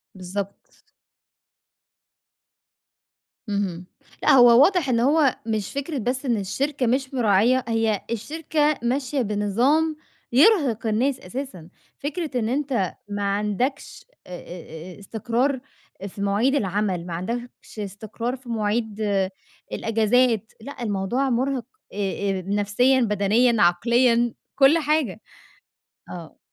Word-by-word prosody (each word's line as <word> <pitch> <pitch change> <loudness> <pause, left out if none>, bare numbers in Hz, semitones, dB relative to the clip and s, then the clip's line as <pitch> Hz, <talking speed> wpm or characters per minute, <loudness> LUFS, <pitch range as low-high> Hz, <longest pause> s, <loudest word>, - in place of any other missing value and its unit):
بالضبط. 190 +2 -7 2.7
اهم، 190 -4 -2 0.4
لأ، - - +5
هو 245 -1 +7
واضح 360 -6 +2
إن 235 -2 +2
هو 280 +1 +3
مش 215 -3 -2
فكرة 280 +2 -3
بس 255 +3 -2
إن 240 -3 +1
الشركة 265 +7 -1
مش 260 +3 0
مراعية، 240 +2 +3
هي 225 -2 +1
الشركة 300 +5 -1
ماشية 265 +3 0
بنظام 240 +10 +1 0.4
يرهق 265 - +4
الناس 250 +5 +1
أساسًا، 185 - -7 0.3
فكرة 290 -2 -3
إن 220 -1 -1
أنت 260 -8 -1 0.2
ما 205 0 -3
عندكش، 210 +6 -2 0.2
آآ، - - -12
آآ، 170 0 -10
آآ - - -16
استقرار 235 +6 -1 0.5
في 200 +1 -9
مواعيد 205 +7 +2
العمل، 195 -6 -1
ما 175 - -6
عندكش 235 +5 -6
استقرار 215 +4 -4
في 250 -1 -14
مواعيد 220 -1 -1 0.7
الأجازات، 225 0 +1
لأ 260 +1 -8
الموضوع 215 +6 -1
مُرهق، 255 0 0 0.3
آآ - - -9 0.4
آآ، 185 - -4
نفسيًا، 205 +6 +2
بدنيًا، 215 +2 +2
عقليًا، 235 +6 +3 0.2
كُلّ 280 +4 +6
حاجة، 295 - 0 0.9
آه. 170 -3 -9
235 Hz, 115 wpm, -23 LUFS, 205-265 Hz, 2.7 s, هو